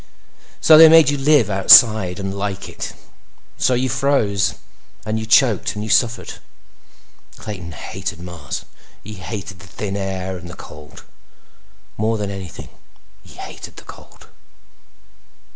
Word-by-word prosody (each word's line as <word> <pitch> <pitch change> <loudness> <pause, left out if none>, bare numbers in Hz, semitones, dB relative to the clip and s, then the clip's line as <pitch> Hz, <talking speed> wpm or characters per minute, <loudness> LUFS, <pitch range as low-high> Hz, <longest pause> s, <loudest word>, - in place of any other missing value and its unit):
So 155 -1 +7
they 160 0 +10
made 160 -3 +6
you 145 - -2
live 140 -5 +3
outside 95 -1 +6
and 95 0 -4
like 100 -1 -5
it. - - -7 0.7
So 125 - +2
you 130 +2 0
froze 105 -9 0 0.5
and 110 +1 -2
you 110 - -6
choked 115 -4 +2
and 105 - -5
you 110 - -4
suffered. 120 -1 0 1.0
Clayton 90 -6 -8
hated 80 +1 -7
Mars. 85 -1 -7 0.4
He 110 - -9
hated 100 -1 -8
the 100 - -14
thin 100 +1 -6
air 95 -1 -4
and 85 0 -11
the 85 - -10
cold. 75 -1 -13 0.9
More 110 +2 0
than 100 -1 -4
anything, 95 -3 -9 0.5
he - - -17
hated - - -10
the - - -13
cold. - - -15
100 Hz, 140 wpm, -19 LUFS, 95-115 Hz, 1.0 s, they